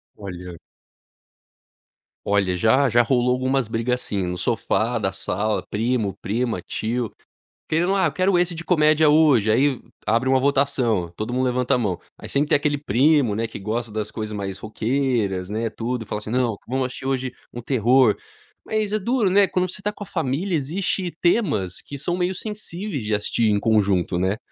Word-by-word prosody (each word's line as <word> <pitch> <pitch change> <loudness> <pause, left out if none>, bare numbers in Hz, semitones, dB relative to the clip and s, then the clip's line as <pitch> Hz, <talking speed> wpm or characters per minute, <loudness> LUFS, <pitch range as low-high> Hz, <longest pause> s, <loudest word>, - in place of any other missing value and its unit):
Olha 90 -3 -8 1.7
Olha, 100 -2 +1
já 130 +8 +3
já 120 +1 +5
rolou 125 0 +2
algumas 130 -1 0
briga 115 +2 -1
assim, 100 -6 -2
no 90 0 -3
sofá 90 - 0
da - - 0
sala, 105 +3 -1
primo, 110 -3 -1
prima, 115 +3 -1
tio, 115 0 -3 0.6
querendo: 175 +5 +2
"Ah 185 -6 +2
quero 185 +4 +2
esse 175 0 +1
de 165 +1 -7
comédia 155 -3 +4
hoje", 145 -8 +4
aí 130 +2 +2 0.3
abre 115 +4 +1
uma 130 0 +4
votação, 130 -9 +1
todo 110 +5 -4
mundo 130 +1 +1
levanta 125 0 +1
a - - +2
mão. 100 -7 -1 0.2
Aí - - -9
sempre 145 +2 0
tem - - +5
aquele 145 0 +1
primo, 140 -1 +3
né, 115 +2 -1
que 110 - -8
gosta 110 +3 -3
das 105 0 -3
coisas 110 -1 -5
mais 100 -2 -4
roqueiras, 110 -4 -1
né, 110 +2 -2
tudo 115 +2 -3
e - - -17
fala 105 - -3
assim 105 +1 -6
não, 120 -4 +1
vamos 130 +1 0
assistir 130 +1 -9
hoje 130 -1 -1 0.2
um 120 - -6
terror. 125 -1 +3 0.5
Mas 215 -1 -1
é 215 - +2
duro, 235 0 +1
né, 195 +1 +5
quando 185 0 0
você 185 - -4
tá 210 - -1
com 210 - -9
a - - -11
família 165 +4 -1
existe 175 +4 -1
temas 150 - +1
que 140 - -8
são 175 +6 -1
meio 180 +1 0
sensíveis 205 - -3
de 105 0 -2
assistir 105 +2 +1
em 105 -1 +2
conjunto, 100 -5 +2
né, 95 +3 0
125 Hz, 185 wpm, -23 LUFS, 110-150 Hz, 1.7 s, já